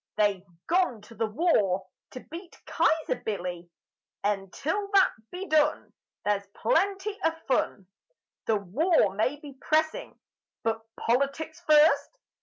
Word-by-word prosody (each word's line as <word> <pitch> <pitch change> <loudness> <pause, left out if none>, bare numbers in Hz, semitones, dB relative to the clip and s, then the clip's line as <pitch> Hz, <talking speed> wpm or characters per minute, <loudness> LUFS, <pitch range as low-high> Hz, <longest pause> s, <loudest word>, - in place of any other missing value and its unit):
They've 200 -3 +1 0.2
gone 340 - +1
to 210 - -14
the 225 0 -1
War 210 - +2 0.3
To 255 - -6
beat 340 +2 -9
Kyzer 320 -5 +1
Billy; 180 -4 -4 0.5
And 195 -2 -1
till 400 +7 -2
that 390 - +6 0.2
be 365 +2 -6
done 305 -3 +1 0.3
There's 200 -1 0
plenty 400 -3 0
of 325 0 +1
fun. 220 -6 0 0.6
The 225 - +3
war 210 - +2
may 220 +8 0
be 285 -3 -12
pressing 315 0 0 0.4
But 225 0 0
Politics 280 +6 -1
first! 305 +10 +5
280 Hz, 125 wpm, -27 LUFS, 205-325 Hz, 0.6 s, that